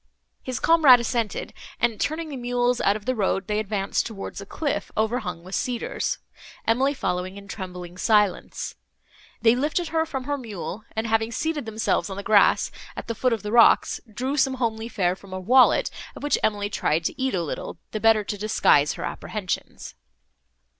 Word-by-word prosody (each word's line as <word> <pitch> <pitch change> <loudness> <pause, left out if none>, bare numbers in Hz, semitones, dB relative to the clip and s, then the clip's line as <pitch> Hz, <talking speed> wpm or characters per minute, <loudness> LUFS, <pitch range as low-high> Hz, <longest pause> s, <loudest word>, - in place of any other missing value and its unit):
His 255 -2 -4
comrade 305 -7 +7
assented, 235 -2 -2 0.3
and, 235 -3 0
turning 315 +1 -1
the 285 - -5
mules 245 0 0
out 200 - +3
of 210 - -7
the 255 - +1
road, 195 -3 0
they 210 +2 -1
advanced 205 -2 -1
towards 200 -3 -7
a 200 - -10
cliff, 280 -8 -3
overhung 215 -7 -1
with 185 +2 -10
cedars, 245 +1 -2 0.5
Emily 265 +5 +2
following 185 -4 -2
in 200 0 -11
trembling 180 -3 -7
silence. 210 -4 +1 0.7
They 225 +1 +6
lifted 305 +6 -1
her 320 0 0
from 265 -4 -4
her 285 +1 -2
mule, 215 -2 -6
and, 220 +1 -1
having 225 0 +1
seated 295 0 -2
themselves 220 -1 0
on 190 - -6
the 200 - -5
grass, 205 -1 +4 0.3
at - - -5
the 230 - -1
foot 250 +3 +1
of 225 -3 -1
the 210 - -4
rocks, 235 0 +5
drew 260 +6 -2
some 265 -1 +2
homely 225 -2 -2
fare 180 -5 0
from 195 0 -13
a 185 - -3
wallet, 250 +7 +4 0.2
of - - -10
which 290 - +2
Emily 205 -1 0
tried 160 -3 0
to 210 - -3
eat 265 -5 +1
a 175 - 0
little, 155 - -5
the 215 - -3
better 225 -1 +4
to 205 0 -4
disguise 170 -8 +3
her - - -7
apprehensions. 205 -4 -5
220 Hz, 185 wpm, -24 LUFS, 200-255 Hz, 0.7 s, comrade